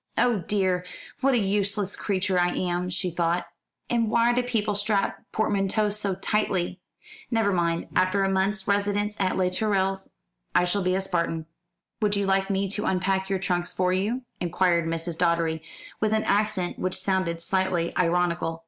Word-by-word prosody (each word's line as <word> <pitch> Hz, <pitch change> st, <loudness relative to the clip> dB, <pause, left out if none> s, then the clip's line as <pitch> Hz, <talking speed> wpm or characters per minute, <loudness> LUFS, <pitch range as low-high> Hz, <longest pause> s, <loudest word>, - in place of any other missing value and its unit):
"Oh 240 Hz, -4 st, +3 dB
dear, 185 Hz, -1 st, 0 dB, 0.4 s
what 270 Hz, 0 st, +3 dB
a -, -, +4 dB
useless 200 Hz, -1 st, 0 dB
creature 190 Hz, -2 st, 0 dB
I 175 Hz, 0 st, +1 dB
am," 180 Hz, 0 st, -1 dB
she 180 Hz, 0 st, -1 dB
thought; 170 Hz, +1 st, 0 dB, 0.4 s
"and 230 Hz, -2 st, +1 dB
why 235 Hz, +2 st, +3 dB
do 250 Hz, -, +2 dB
people 225 Hz, -4 st, -1 dB
strap 205 Hz, 0 st, 0 dB
portmanteaux 205 Hz, 0 st, +1 dB
so 200 Hz, -2 st, -1 dB
tightly? 190 Hz, -2 st, -1 dB, 0.5 s
Never 225 Hz, -4 st, +2 dB
mind, 170 Hz, -2 st, 0 dB
after 185 Hz, +2 st, +3 dB
a -, -, +2 dB
month's 190 Hz, +1 st, 0 dB
residence 205 Hz, +1 st, +1 dB
at 190 Hz, -2 st, +1 dB
Les 180 Hz, -1 st, +1 dB
Tourelles 195 Hz, -1 st, 0 dB, 0.5 s
I 180 Hz, -, +5 dB
shall 200 Hz, +3 st, +1 dB
be 185 Hz, 0 st, +1 dB
a 190 Hz, -, +1 dB
Spartan." 170 Hz, -4 st, -1 dB, 0.6 s
"Would 210 Hz, -1 st, +2 dB
you 200 Hz, 0 st, 0 dB
like 195 Hz, 0 st, +1 dB
me 195 Hz, 0 st, 0 dB
to 210 Hz, +2 st, -2 dB
unpack 190 Hz, +1 st, 0 dB
your 195 Hz, -, +1 dB
trunks 175 Hz, -2 st, -1 dB
for 185 Hz, 0 st, +1 dB
you?" 215 Hz, +7 st, -1 dB, 0.2 s
inquired 175 Hz, -1 st, +1 dB
Mrs. 165 Hz, 0 st, -3 dB
Doddery, 170 Hz, -2 st, +1 dB, 0.4 s
with 215 Hz, 0 st, +1 dB
an 220 Hz, 0 st, +2 dB
accent 205 Hz, -3 st, 0 dB
which 185 Hz, 0 st, -1 dB
sounded 185 Hz, -4 st, 0 dB
slightly 180 Hz, -1 st, 0 dB
ironical. 170 Hz, -1 st, +1 dB
190 Hz, 165 wpm, -26 LUFS, 180-205 Hz, 0.6 s, I